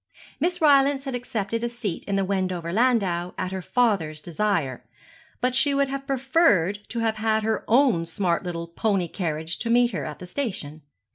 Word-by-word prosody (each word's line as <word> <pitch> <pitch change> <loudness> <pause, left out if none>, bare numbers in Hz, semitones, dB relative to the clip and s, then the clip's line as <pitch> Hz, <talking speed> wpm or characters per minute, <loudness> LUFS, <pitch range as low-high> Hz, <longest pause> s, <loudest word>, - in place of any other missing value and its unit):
Miss 355 +1 0
Rylance 280 -2 +5
had 270 -2 -4
accepted 230 -3 -3
a 240 - 0
seat 235 -7 -4
in 200 - -1
the 195 -1 +1
Wendover 185 -3 -2
landau 195 -7 +1
at 185 0 -3
her 190 0 -3
father's 190 -9 +1
desire; 165 -6 -1 0.6
but 250 0 +1
she 280 +2 +3
would 280 -1 +2
have 275 0 -5
preferred 260 - +2
to 235 - -3
have 220 -1 0
had 220 0 +1
her 220 0 0
own 230 -9 +3
smart 175 0 0
little 170 -2 -4
pony 190 +1 0
carriage 160 -2 -3
to 230 - -3
meet 240 +1 +4
her - - -3
at 150 -1 -6
the 180 - -9
station. 180 - -4
210 Hz, 185 wpm, -25 LUFS, 175-250 Hz, 0.6 s, Rylance